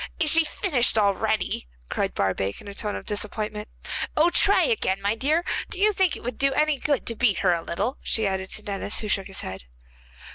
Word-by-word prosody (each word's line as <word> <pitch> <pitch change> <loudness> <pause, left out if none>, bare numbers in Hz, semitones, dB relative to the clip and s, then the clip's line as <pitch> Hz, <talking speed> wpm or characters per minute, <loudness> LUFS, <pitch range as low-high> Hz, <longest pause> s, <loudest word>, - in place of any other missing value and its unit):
'Is 310 -4 +4
she 330 0 +6
finished 250 -6 +1
already?' 200 - 0 0.2
cried - - -2
Barbaik, 95 0 -1
in - - -12
a 200 - -7
tone 205 +1 -4
of - - -7
disappointment. 210 0 -3 0.5
'Oh, 330 +3 +4
try 400 - +5
again, 410 - +1
my 200 +1 0
dear. 305 +9 0 0.2
Do - - -5
you 420 +2 +3
think 375 -5 +2
it - - -9
would 245 +2 -5
do 275 0 +3
any 300 0 +1
good 285 -2 0
to 230 - +1
beat 210 -6 +2
her 180 - +5
a 170 - -1
little?' 205 +11 -3
she 220 - 0
added 190 -1 -2
to 215 - -3
Denis, 200 0 -1
who 215 - -4
shook 195 -2 +1
his 195 - -5
head. 95 -9 -7
215 Hz, 215 wpm, -25 LUFS, 195-300 Hz, 0.5 s, she